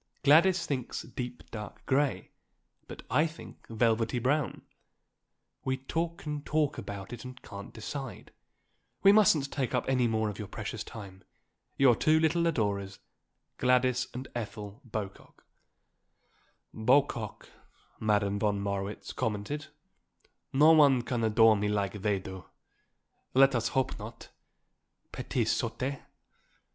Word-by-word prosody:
Gladys 170 +5 +5
thinks 130 -6 -3
deep, 125 -1 -6
dark 105 -2 -8
grey, 140 +1 0 0.6
but - - -9
I 155 +2 +4
think 160 +1 -13
velvety 115 +1 +1
brown; 130 0 0 1.0
we 130 0 0
talk 165 +6 -3
and 150 -1 -4
talk 150 -1 0
about 100 +2 -7
it 120 - -8
and 130 0 -9
can't 100 0 -9
decide. 125 -1 -7 0.7
We 195 - +9
mustn't 165 -10 +4
take 130 -4 -1
up - - -1
any 130 -2 +2
more 110 -1 0
of 105 -3 -5
your 105 - -5
precious 110 +2 -5
time. 100 -4 -10 0.5
Your 130 -4 +6
two 155 +7 +3
little 165 +1 +2
adorers, 100 -9 -1 0.6
Gladys 125 0 +3
and 130 +2 -6
Ethel 105 -1 -6
Bocock." 105 -5 -7 1.3
"Bocock," 120 -2 +1 0.5
Madame 105 -2 +1
von 105 -1 +1
Marwitz 100 0 -4
commented. 115 +8 -3 0.8
"No 150 +4 +6
one 140 -6 +6
can 120 -2 -2
adore 110 0 +5
me 105 0 0
like 105 -1 -1
they 105 -1 +1
do. 95 -2 -8 0.9
Let 135 +1 +6
us 115 -1 +1
hope 130 0 -1
not. - - -9 0.8
_Petites - - -1
sottes. 135 +1 -2
120 Hz, 125 wpm, -30 LUFS, 105-140 Hz, 1.3 s, We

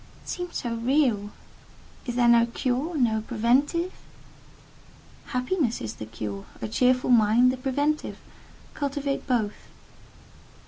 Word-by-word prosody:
It - - -11
seemed 355 -1 -5
so 240 -2 -2
real. 235 -4 +1 0.8
Is 245 - -3
there 245 -1 +3
no 235 0 +6
cure?—no 250 -2 0
preventive?" 265 - +1 1.3
"Happiness 250 0 0
is 110 -1 -5
the 110 - -8
cure—a 110 -1 -6
cheerful 250 - +2
mind 235 +2 +5
the 260 - -4
preventive: 285 +4 -1 0.6
cultivate 280 -1 -2
both." 220 -5 -1
250 Hz, 105 wpm, -26 LUFS, 220-280 Hz, 1.3 s, no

